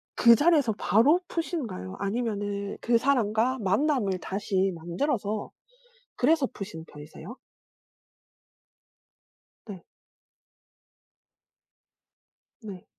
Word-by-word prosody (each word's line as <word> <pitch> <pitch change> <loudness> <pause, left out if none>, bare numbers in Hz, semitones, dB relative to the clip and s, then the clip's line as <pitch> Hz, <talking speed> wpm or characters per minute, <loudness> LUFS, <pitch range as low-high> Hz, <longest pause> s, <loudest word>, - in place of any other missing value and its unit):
그 235 -1 +7
자리에서 290 -5 +3
바로 235 - +3
푸시는가요 255 - -4
아니면은 205 -2 -3
그 235 0 +3
사람과 245 -1 +1
만남을 205 -1 +1
다시 195 0 -1
만들어서 205 - -2 0.7
그래서 285 +2 +3
푸시는 195 -9 -8
편이세요? 155 +8 -11 2.3
네. 195 -5 -9 2.8
네. 195 -4 -9
215 Hz, 190 characters per minute, -27 LUFS, 195-255 Hz, 2.8 s, 그